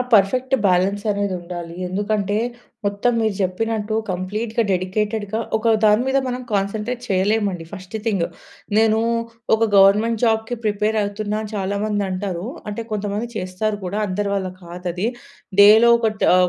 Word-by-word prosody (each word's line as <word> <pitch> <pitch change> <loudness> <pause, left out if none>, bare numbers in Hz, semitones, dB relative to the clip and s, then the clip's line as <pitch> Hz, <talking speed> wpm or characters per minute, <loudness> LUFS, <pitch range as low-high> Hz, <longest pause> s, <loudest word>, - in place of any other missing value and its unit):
Perfect 250 +6 +4
balance 190 +2 +2
అనేది 200 -2 -1
ఉండాలి. 170 -1 -7
ఎందుకంటే, 205 +1 -1 0.5
మొత్తం 200 +4 +1
మీరు 220 -2 +1
జెప్పినట్టు 215 +3 -1 0.2
కంప్లీట్‌గా 215 +6 -2
డెడికేటెడ్‌గా 205 +3 -1 0.2
ఒక 225 +1 +2
దాని 210 +2 +5
మీద 265 +1 +2
మనం 250 0 -3
కాన్సంట్రేట్ 210 +5 -1
చేయలేమండి, 195 -2 +1
ఫస్ట్ 190 +1 -7
థింగ్, 200 -6 +1 0.5
నేను 220 0 +4 0.6
ఒక 225 0 +2
గవర్నమెంట్ 210 +4 +5
జాబ్‌కి 225 +1 +1
ప్రిపేర్ 210 +1 +1
అవుతున్నా 205 +1 -2
అని 215 0 -8
చాలా 200 +1 -1
మంది 205 -1 0
అంటారు. 185 -1 -3 0.2
అంటే 225 +2 -5
కొంతమంది 210 +2 -2
చేస్తారు 200 +3 -2
కూడా, 200 +4 -2
అందరి 200 +1 -2
వల్ల 190 -2 -2
కాదది. 180 +2 -4 0.5
డేలో 220 +3 +8
ఒక 225 -2 +1
తా - - +5
205 Hz, 140 wpm, -21 LUFS, 190-220 Hz, 0.6 s, డేలో